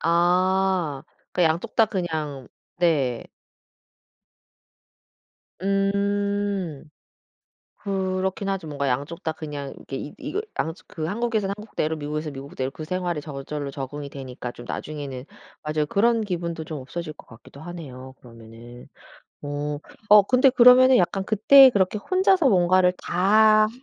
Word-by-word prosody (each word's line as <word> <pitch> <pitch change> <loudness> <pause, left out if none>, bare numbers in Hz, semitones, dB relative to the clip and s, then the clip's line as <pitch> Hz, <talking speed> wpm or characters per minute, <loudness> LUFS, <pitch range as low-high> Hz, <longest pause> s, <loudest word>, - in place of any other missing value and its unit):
아. 180 -2 +1 0.3
그 180 - +1
양쪽 165 +1 0
다 225 - +5
그냥 155 - -4 0.3
네. 145 -9 +1 2.4
음. 200 -4 -1 0.9
그렇긴 190 0 -2
하죠. 190 -4 -3
뭔가 140 -2 -2
양쪽 140 +6 -3
다 160 - -1
그냥 150 -3 -7
이렇게 135 - -8
이 145 - -6
이걸 410 - -4 0.2
양쪽 160 +2 -4
그 155 -1 -5
한국에서는 210 0 -1
한국대로 185 -7 -3
미국에서 150 +1 -4
미국대로 135 -1 -5
그 155 - -8
생활에 175 -1 -2
저절로 145 0 -6
적응이 140 +1 -6
되니까 130 -3 -7
좀 120 - -12
나중에는 140 -4 -6 0.4
맞아요 150 0 -1
그런 230 +7 +2
기분도 170 -5 -4
좀 155 -1 -6
없어질 155 +4 -7
것 - - -16
같기도 115 +4 -15
하네요 130 -7 -9
그러면은. 115 0 -13 0.6
어. 145 0 -4 0.3
어 210 0 +8
근데 255 +6 +4
그러면은 255 +1 +7
약간 190 0 +1
그때 260 +6 +7
그렇게 200 -2 +1
혼자서 370 - +2
뭔가를 180 -2 +3
다 215 +4 +4
170 Hz, 275 characters per minute, -24 LUFS, 145-200 Hz, 2.4 s, 어